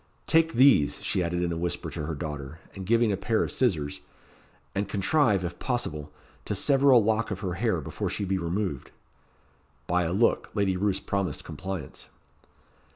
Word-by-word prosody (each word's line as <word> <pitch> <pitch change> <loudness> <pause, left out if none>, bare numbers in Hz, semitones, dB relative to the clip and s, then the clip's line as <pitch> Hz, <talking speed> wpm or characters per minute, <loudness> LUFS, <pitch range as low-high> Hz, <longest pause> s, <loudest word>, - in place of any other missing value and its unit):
"Take 165 0 +3
these," 125 - +5
she 95 - 0
added 90 0 -1
in 85 - -1
a 85 - -2
whisper 85 0 -2
to 75 - -4
her 80 - -3
daughter, 75 -1 -6 0.2
and 95 -2 -8
giving 115 0 +3
a - - +1
pair 110 +3 +1
of - - -3
scissors; 80 - 0 0.7
"and 100 0 -2
contrive, 105 - +2
if 85 0 -5
possible, 75 - -3 0.3
to - - -2
sever 140 -1 +3
a 130 - +8
lock 110 0 +2
of 95 -2 -4
her 95 -3 -2
hair 110 -2 0
before - - -4
she 100 - -2
be 95 0 0
removed." 85 -3 -2 1.0
By 90 0 +1
a 80 - -1
look 105 +6 +2
Lady 100 -3 +1
Roos 95 +1 0
promised 95 -7 -2
compliance. 95 -6 -7
95 Hz, 175 wpm, -27 LUFS, 85-110 Hz, 1.0 s, a